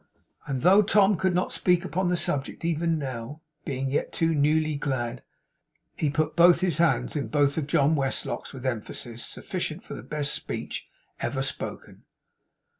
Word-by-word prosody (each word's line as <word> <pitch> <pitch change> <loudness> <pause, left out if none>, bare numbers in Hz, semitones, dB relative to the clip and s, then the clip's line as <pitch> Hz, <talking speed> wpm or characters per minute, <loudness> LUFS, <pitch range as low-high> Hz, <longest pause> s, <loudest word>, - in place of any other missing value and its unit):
And 135 -2 -2
though 190 +4 +7
Tom 205 0 +4
could 185 +1 +1
not 180 - 0
speak 180 0 +2
upon 185 +1 -1
the 180 0 +1
subject 140 0 -1
even 165 0 +1
now; 135 +1 -5 0.2
being 135 -1 -2
yet 145 - 0
too 165 0 +1
newly 155 +1 +2
glad, 130 -4 -2 0.7
he 150 - 0
put 155 +2 0
both 175 0 +6
his 175 -5 +1
hands 170 -1 +2
in 145 - -1
both 145 -1 +2
of 155 -3 -2
John's 140 -1 +2 0.3
with 130 -2 -9
emphasis 120 -1 -4
sufficient - - -4
for - - -8
the - - -6
best 150 -1 -2
speech - - -5 0.3
ever 135 -1 -1
spoken. 135 - -5
150 Hz, 160 wpm, -26 LUFS, 135-170 Hz, 0.7 s, though